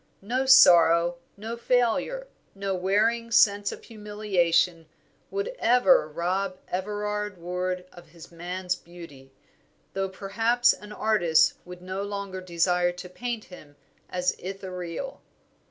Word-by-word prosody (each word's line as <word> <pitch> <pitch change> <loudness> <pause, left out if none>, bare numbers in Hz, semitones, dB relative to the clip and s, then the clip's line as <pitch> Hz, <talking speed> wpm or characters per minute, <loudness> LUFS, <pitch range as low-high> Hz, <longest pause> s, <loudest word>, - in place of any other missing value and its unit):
No 255 +6 -1
sorrow, 175 -8 +6 0.2
no 220 +3 -5
failure, 250 - 0 0.3
no 195 0 -2
wearing 210 +5 +1
sense 205 -3 +4
of - - -10
humiliation, 185 -6 0 0.4
would 400 +4 -3
ever 250 - +4
rob 185 +4 -2
Everard 210 +1 -3
Ward 180 +1 -3
of 175 -2 -15
his 165 +1 -14
man's 180 +2 -3
beauty, 165 -7 -13 0.6
though 195 0 -2
perhaps 225 +6 +2
an 210 0 -12
artist 175 -8 +3
would 180 0 -11
no 185 +1 -4
longer 200 -2 -5
desire 175 0 +1
to 180 +1 -9
paint 235 +3 -4
him 150 -5 -14 0.3
as 180 0 -1
Ithuriel. 185 +3 -6
190 Hz, 120 wpm, -26 LUFS, 175-215 Hz, 0.6 s, sorrow